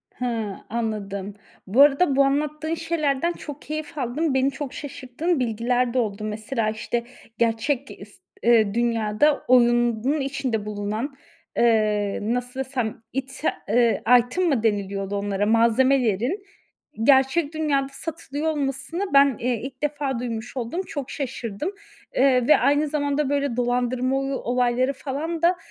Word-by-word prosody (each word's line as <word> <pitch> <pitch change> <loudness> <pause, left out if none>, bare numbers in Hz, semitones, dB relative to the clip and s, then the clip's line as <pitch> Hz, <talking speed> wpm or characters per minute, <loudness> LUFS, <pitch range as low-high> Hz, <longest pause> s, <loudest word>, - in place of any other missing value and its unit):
Hıı, 225 -5 -2
anladım. 205 -3 -3 0.3
Bu 230 +9 +4
arada 285 +1 +5
bu 275 - +5
anlattığın 300 +3 0
şeylerden 325 -1 0
çok 295 -3 -9
keyif 310 0 -6
aldım. 275 +4 -1
Beni 265 +1 +2
çok 275 -1 -6
şaşırttığın 285 +4 -3
bilgiler 245 +1 0
de 255 - +2
oldu. 210 -2 -2
Mesela, 215 +1 -2
işte, 225 +2 -2 0.3
gerçek 240 +4 0
ge 205 - -11
ıst 200 -1 -12 0.2
ııı, 220 -4 +4
dünyada 235 +4 +1
oyunun 240 +2 +3
içinde 270 -6 -2
bulunan, 210 +6 -3 0.4
eee, 215 -3 +2
nasıl 245 +4 -2
desem 255 -5 -3
ite 270 +3 -2 0.2
eee, 235 +1 +3 0.2
item 250 +10 -1
mı 250 -6 +1
deniliyordu 200 -2 -1
onlara? 200 0 -1
Malzemelerin 240 - +2 0.6
gerçek 280 +4 +4
dünyada 290 -3 0
satılıyor 305 0 -5
olmasını 285 +4 -2
ben, 275 -3 +5
eee, 240 -2 -1
ilk 265 +2 -8
defa 285 -4 -1
duymuş 240 +1 -5
oldum. 250 +10 -2
Çok 285 -5 -5
şaşırdım. 260 - -4 0.4
Eee, 255 -2 +3
ve 305 - +7
aynı 290 +2 +2
zamanda 285 -1 0
böyle 280 -4 0
dolandırma 250 +1 0
oy 275 0 -2
olayları 250 +1 +1
falan 305 +5 -4
da, 350 +1 +3
255 Hz, 135 wpm, -24 LUFS, 230-285 Hz, 0.6 s, ve